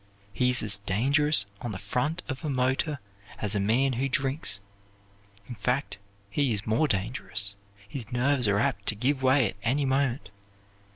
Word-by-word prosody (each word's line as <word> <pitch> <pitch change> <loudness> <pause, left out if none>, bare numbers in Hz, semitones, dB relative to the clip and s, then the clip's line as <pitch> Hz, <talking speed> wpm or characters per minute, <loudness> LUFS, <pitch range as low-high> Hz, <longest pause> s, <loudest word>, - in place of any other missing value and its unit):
He 125 +7 +2
is 125 -1 +4
as 105 -2 +2
dangerous 130 +7 +2 0.2
on 120 -3 -4
the - - -4
front 125 - -2
of 130 +4 -5
a 155 - -2
motor 130 +3 0 0.4
as 105 -1 -3
a 105 - +1
man 120 +7 +2
who 135 +3 -1
drinks. 135 -4 0 0.9
In 125 - -6
fact, 125 +2 -2 0.3
he 140 +3 +1
is 105 -1 -1
more 115 +8 +2
dangerous; 100 -2 -1 0.3
his 115 -1 -5
nerves 125 0 +2
are 100 0 +2
apt 110 -4 -1
to 105 - +2
give 130 +5 0
way 130 -2 +4
at 95 - -10
any 135 +5 +1
moment. 130 -5 0
125 Hz, 170 wpm, -27 LUFS, 105-135 Hz, 0.9 s, is